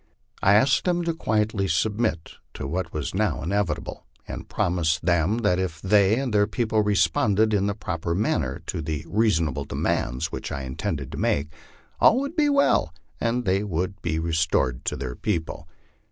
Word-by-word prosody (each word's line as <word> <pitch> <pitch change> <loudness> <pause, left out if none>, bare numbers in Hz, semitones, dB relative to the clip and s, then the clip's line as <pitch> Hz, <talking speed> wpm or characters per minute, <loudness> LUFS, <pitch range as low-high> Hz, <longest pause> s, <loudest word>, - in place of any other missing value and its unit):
I 95 +2 +5
asked 135 +6 +3
them 175 -1 +1
to 165 0 0
quietly 105 -7 0
submit 105 +1 -1 0.2
to - - -5
what 85 +4 -3
was 75 -2 -4
now 95 -9 0
inevitable, 90 -2 -2 0.2
aiul - - -7
promised 85 -2 0
them 85 +4 +2
that 90 -3 +3
if 90 -4 -3
they 100 +3 +3
and 130 -3 -2
their 105 0 +4
people 110 -1 0
responded 105 +2 +2
in 100 -1 +2
the 100 - -1
proper 85 -4 -3
man 100 -4 +1
ner 65 -4 -5
to - - -3
the 80 0 -4
reasonable 85 - +1
demands 60 +2 -1
which - - -5
I 70 - -4
intended 65 0 -4
to - - -6
make, 70 +2 0 0.5
all 245 - +6
would 280 +4 -4
be 300 -3 +3
well, 280 0 +2 0.2
and 120 +1 0
they 95 +1 +2
would 95 0 -3
be 80 -2 -1
restored 80 -6 0
to - - -1
their 65 -2 -4
people. 80 +2 -3
95 Hz, 175 wpm, -25 LUFS, 80-110 Hz, 0.5 s, all